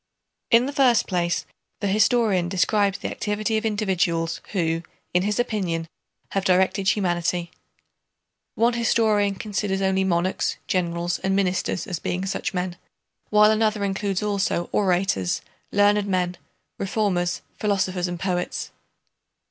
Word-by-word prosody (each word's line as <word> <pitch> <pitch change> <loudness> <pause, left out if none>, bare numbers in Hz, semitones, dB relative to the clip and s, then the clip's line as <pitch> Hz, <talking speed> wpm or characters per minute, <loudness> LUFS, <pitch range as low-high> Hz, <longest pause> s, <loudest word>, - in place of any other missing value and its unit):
In 235 +1 +5
the 280 - -4
first 255 -5 +4
place 175 -2 -1 0.3
the - - -3
historian 200 -2 +2
describes 200 +1 +2
the - - -4
activity 215 +1 -1
of 220 +1 +1
individuals 180 -6 0
who 165 -3 0 0.3
in 180 - +3
his 205 +3 -1
opinion 185 -9 -1 0.4
have 195 - 0
directed 190 +1 +2
humanity 175 -3 0 1.0
(one 235 +2 +3
historian 220 -3 +2
considers 200 -1 -2
only 190 0 +2
monarchs, 185 0 0
generals, 175 -1 -1
and 190 0 0
ministers 190 -2 0
as 180 -4 -4
being 185 +2 -2
such 195 - -2
men, 180 -1 -3 0.5
while 210 0 +6
another 215 -1 +1
includes 195 0 -1
also 200 -4 0
orators, 180 - +1 0.3
learned 205 0 +3
men, 180 -2 0 0.4
reformers, 190 -3 0 0.2
philosophers, 190 -3 0
and 175 -1 -5
poets). 180 -1 -2
190 Hz, 125 wpm, -24 LUFS, 180-210 Hz, 1.0 s, while